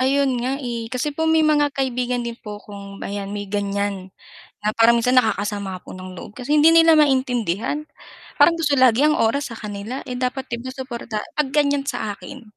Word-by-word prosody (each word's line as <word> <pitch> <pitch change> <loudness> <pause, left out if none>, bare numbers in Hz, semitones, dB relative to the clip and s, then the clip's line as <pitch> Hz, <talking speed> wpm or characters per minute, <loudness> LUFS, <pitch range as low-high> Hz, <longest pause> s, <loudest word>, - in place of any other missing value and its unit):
Ayun 265 -1 +2
nga, 260 +3 -1
eh. 240 -4 -4
Kasi 255 +5 -2
po 320 +2 -1
may 320 0 +4
mga 295 -1 +3
kaibigan 250 -2 -1
din 235 - -3
po 210 -1 -7
kong 200 -1 -10
ayan 200 0 -4
may 205 0 -4
ganyan, 200 -1 -2 0.5
na 215 +1 -2
parang 235 +1 +5
minsan 250 +2 +2
nakakasama 205 -5 0
po - - -11
ng 185 0 -9
loob, 210 - -11
kasi 255 +3 -5
hindi 325 +2 +6
nila 330 -1 +7
maintindihan. 260 - +1 0.5
Parang 335 -1 +4
gusto 295 -3 +2
lagi 255 +1 +5
ang 305 - +3
oras 255 +4 +1
sa - - -6
kanila, 210 +4 -6
eh, 250 0 -6
dapat 260 +1 -2 0.3
suporta 235 -5 -5 0.2
'pag 300 - +2
ganyan 285 -1 +2
sa 220 -6 -2
akin 270 +4 -11
245 Hz, 185 wpm, -21 LUFS, 210-280 Hz, 0.5 s, nila